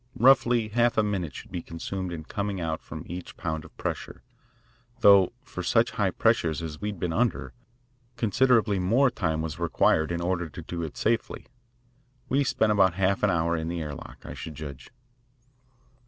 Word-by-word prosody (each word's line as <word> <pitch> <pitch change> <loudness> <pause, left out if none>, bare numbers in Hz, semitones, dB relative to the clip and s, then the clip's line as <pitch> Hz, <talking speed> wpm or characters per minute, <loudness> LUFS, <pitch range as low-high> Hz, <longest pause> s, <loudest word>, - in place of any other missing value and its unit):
Roughly, 120 -2 +4
half 120 +2 +2
a 110 - +4
minute 95 -9 -2
should - - -10
be 85 - -3
consumed 90 +3 -5
in 80 -2 -5
coming 100 +2 -3
out 80 -2 -2
from - - -8
each 90 +1 -8
pound 80 -1 -3
of 80 - -16
pressure, - - -5 0.8
though 100 -4 +7
for - - -6
such - - +2
high - - +1
pressures 80 0 +1
as 75 -2 -6
we 105 - -1
had 100 -4 -7
been 85 -2 -1
under, 120 +3 0 0.6
considerably 115 -2 +3
more 120 +9 +3
time 80 -3 -1
was 80 -2 -5
required 80 +2 +2
in 85 - -1
order 85 -1 -1
to - - -9
do 85 -1 -5
it 80 -3 -6
safely. 115 +1 -1 0.8
We 140 +2 +3
spent 110 -4 +2
about 95 -4 +4
half 95 0 +1
an 105 - +3
hour 85 -1 +1
in 80 -1 -3
the 85 0 -3
air 75 -2 -4
lock, - - -11
I - - -6
should 80 - -8
judge. 70 -4 -8
90 Hz, 185 wpm, -27 LUFS, 80-105 Hz, 0.8 s, though